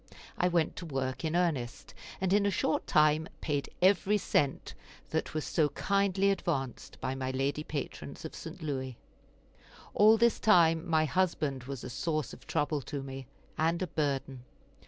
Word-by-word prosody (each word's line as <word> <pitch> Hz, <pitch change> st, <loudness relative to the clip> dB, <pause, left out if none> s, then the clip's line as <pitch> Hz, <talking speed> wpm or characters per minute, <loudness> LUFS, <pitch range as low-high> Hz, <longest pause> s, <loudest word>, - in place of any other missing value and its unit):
I 180 Hz, -, +2 dB
went 170 Hz, -3 st, +1 dB
to 175 Hz, -, -6 dB
work 135 Hz, -2 st, -3 dB
in 160 Hz, +1 st, -1 dB
earnest, 150 Hz, -10 st, -1 dB, 0.3 s
and 190 Hz, 0 st, +1 dB
in 205 Hz, 0 st, +4 dB
a -, -, +3 dB
short 170 Hz, -4 st, 0 dB
time 155 Hz, +1 st, +3 dB
paid 145 Hz, -3 st, -2 dB
every 200 Hz, +2 st, +4 dB
cent 145 Hz, -8 st, 0 dB, 0.4 s
that -, -, -2 dB
was 155 Hz, -, -1 dB
so 155 Hz, -3 st, +2 dB
kindly 195 Hz, +4 st, +1 dB
advanced 140 Hz, -10 st, -3 dB
by 130 Hz, -, -2 dB
my 130 Hz, -1 st, -3 dB
lady 135 Hz, +3 st, -1 dB
patrons 145 Hz, 0 st, -6 dB
of 160 Hz, -, -6 dB
St. 165 Hz, +1 st, -8 dB
Louis. 130 Hz, -4 st, -3 dB, 1.0 s
All 215 Hz, +2 st, +6 dB
this 235 Hz, 0 st, +3 dB
time 170 Hz, -5 st, +4 dB
my 160 Hz, -1 st, +3 dB
husband 150 Hz, -6 st, 0 dB
was 135 Hz, -2 st, -6 dB
a -, -, -5 dB
source 155 Hz, 0 st, -2 dB
of -, -, -14 dB
trouble 150 Hz, 0 st, 0 dB
to 140 Hz, +1 st, -5 dB
me, 135 Hz, -1 st, -7 dB, 0.3 s
and 165 Hz, +2 st, +2 dB
a -, -, +1 dB
burden. 140 Hz, -5 st, -2 dB
155 Hz, 165 wpm, -31 LUFS, 135-180 Hz, 1.0 s, All